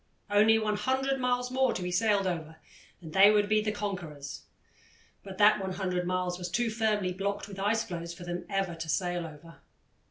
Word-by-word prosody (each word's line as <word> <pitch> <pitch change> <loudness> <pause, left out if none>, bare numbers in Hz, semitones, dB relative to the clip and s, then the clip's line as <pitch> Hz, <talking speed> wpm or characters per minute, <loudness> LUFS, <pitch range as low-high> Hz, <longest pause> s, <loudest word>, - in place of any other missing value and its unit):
Only 215 +2 +5
100 260 +6 0
miles 250 0 0
more 260 -1 +2
to - - -4
be 180 - -3
sailed 200 +1 +2
over 160 -3 -3 0.5
and 160 -1 -9
they 195 +3 +8
would 210 -1 +3
be 215 0 +3
the 215 0 -1
conquerors 175 -9 -6 0.8
but 195 -1 -10
that 210 +1 +6
100 185 -2 -2
miles 180 0 -1
was 180 0 -4
too 230 +5 0
firmly 215 -4 0
blocked 200 +1 -3
with 195 -2 -9
ice 215 +3 +1
floes 170 -5 -6
for 175 +1 -10
them 175 0 -5
ever 195 -3 -1
to 165 -1 -6
sail 175 0 -1
over. 160 +2 -13
195 Hz, 185 wpm, -29 LUFS, 175-215 Hz, 0.8 s, they